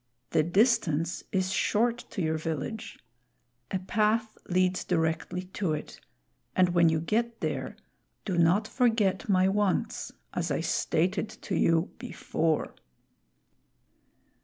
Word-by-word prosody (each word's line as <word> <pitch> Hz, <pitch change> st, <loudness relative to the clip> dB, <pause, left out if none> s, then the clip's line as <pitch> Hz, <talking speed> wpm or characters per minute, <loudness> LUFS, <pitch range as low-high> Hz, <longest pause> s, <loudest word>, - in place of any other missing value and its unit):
The -, -, +4 dB
distance 175 Hz, -, +2 dB
is 190 Hz, -1 st, 0 dB
short 235 Hz, +5 st, +1 dB
to 190 Hz, -, -3 dB
your 160 Hz, 0 st, 0 dB
village. 160 Hz, +7 st, -4 dB, 0.7 s
A -, -, 0 dB
path 215 Hz, +3 st, 0 dB
leads 185 Hz, 0 st, +2 dB
directly 165 Hz, +1 st, -1 dB
to 185 Hz, -6 st, 0 dB
it, 150 Hz, -, -6 dB, 0.5 s
and 185 Hz, -1 st, +4 dB
when 170 Hz, -1 st, +4 dB
you 160 Hz, 0 st, +1 dB
get 230 Hz, +7 st, -1 dB
there, -, -, -3 dB, 0.5 s
do 190 Hz, -, -1 dB
not 175 Hz, +6 st, +3 dB
forget 225 Hz, -4 st, +1 dB
my 185 Hz, -1 st, +4 dB
wants 200 Hz, -1 st, 0 dB, 0.2 s
as -, -, -1 dB
I -, -, 0 dB
stated 185 Hz, +6 st, 0 dB
to 200 Hz, -, -7 dB
you 165 Hz, +2 st, +2 dB
before." 165 Hz, -, -1 dB
185 Hz, 120 wpm, -28 LUFS, 165-215 Hz, 0.7 s, The